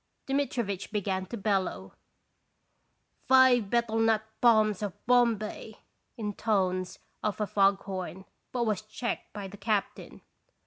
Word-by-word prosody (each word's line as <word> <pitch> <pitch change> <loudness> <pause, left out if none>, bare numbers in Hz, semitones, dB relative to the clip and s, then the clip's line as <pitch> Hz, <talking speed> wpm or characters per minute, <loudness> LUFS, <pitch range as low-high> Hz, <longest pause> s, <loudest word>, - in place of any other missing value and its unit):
Dmitrivitch 240 -8 -2
began 190 -3 -2
to 235 - -6
bellow: 190 - -1 0.7
" - - -43
Five 260 -5 +6
betel 235 -1 +1
nut 225 -1 +3 0.2
palms 215 -4 +4
of 205 -3 -3
Bombay," 230 -3 +1 0.4
intones 195 -4 -1 0.2
of 210 0 -2
a 210 - +1
fog 195 -1 +2
horn, 190 -1 -6 0.3
but 245 -2 0
was 215 -3 0
checked 215 +3 -5
by 205 -2 -6
the 200 +2 -11
captain. 210 0 -2
210 Hz, 125 wpm, -29 LUFS, 195-230 Hz, 0.7 s, Five